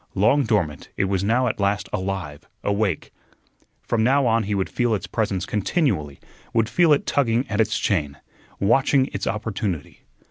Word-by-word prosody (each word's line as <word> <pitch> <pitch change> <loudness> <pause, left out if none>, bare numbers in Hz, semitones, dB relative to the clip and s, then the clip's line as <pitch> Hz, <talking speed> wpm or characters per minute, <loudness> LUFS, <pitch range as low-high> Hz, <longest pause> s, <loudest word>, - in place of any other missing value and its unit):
Long 120 +8 +3
dormant, 90 -10 -1
it - - +2
was 95 -1 0
now 120 +5 +2
at 120 - -1
last 100 +1 0
alive, 95 -6 -4
awake. 100 -5 -1 0.7
From 115 -2 0
now 135 +3 +3
on 115 -1 +3
he 105 +1 -1
would 95 -1 0
feel 120 -3 0
its 100 - -4
presence 100 -5 -1
continually; 100 - -1 0.4
would 115 -1 +3
feel 175 -3 +4
it 145 - +3
tugging 125 -1 +1
at 105 0 +1
its 110 -1 +1
chain, 75 -11 -1 0.4
watching 135 +5 +3
its - - -3
opportunity. 105 -6 -3
105 Hz, 165 wpm, -23 LUFS, 95-120 Hz, 0.7 s, feel